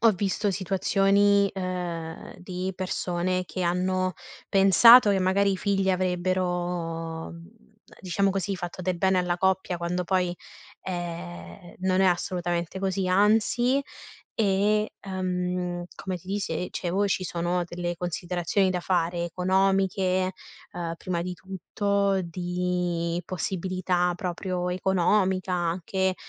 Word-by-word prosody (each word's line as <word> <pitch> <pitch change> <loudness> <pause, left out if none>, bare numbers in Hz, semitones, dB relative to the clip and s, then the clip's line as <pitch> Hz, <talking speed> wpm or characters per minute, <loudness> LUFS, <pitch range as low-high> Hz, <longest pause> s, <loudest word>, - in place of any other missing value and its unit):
ho 230 - +6
visto 200 +2 -1
situazioni, 195 +2 +3
ehm, 175 -3 -5
di 180 +1 -4
persone 185 0 -1
che 185 - -4
hanno 185 +1 0 0.4
pensato 205 +5 +8
che, 195 - +2
magari, 195 +2 +2
i - - -1
figli 195 0 0
avrebbero, 175 -3 -1
mhmm, 170 +1 -12 0.5
diciamo 195 +2 +1
così, 195 +1 -1
fatto 175 0 -6
del 180 -1 -1
bene 190 +1 +3
alla 180 -1 0
coppia, 190 -1 +1
quando 180 +1 -2
poi, 180 -1 +1 0.5
ehm, 175 +1 -7
non 185 0 +2
è - - +4
assolutamente 175 -1 -1
così, 190 -1 -1
anzi, 220 +7 +3 0.5
e, 210 +1 +2
ehm, 180 -2 -2
come 185 -1 -4
ti 175 - -15
dise 185 -3 -2
dicevo 190 +3 -1
ci 190 -1 0
sono 175 0 -1
delle 175 0 -3
considerazioni 175 +2 0
da 180 -1 -1
fare: 175 -1 0
economiche, 185 +1 +1 0.4
ehm, 170 -1 -4
prima 175 -1 -3
di 180 +1 -4
tutto, 195 +1 -1
di 175 -1 -2
possibilità 185 0 -1
proprio 180 -1 -3
economica, 185 +1 +1
anche, 180 +2 0
185 Hz, 120 wpm, -26 LUFS, 175-190 Hz, 0.5 s, pensato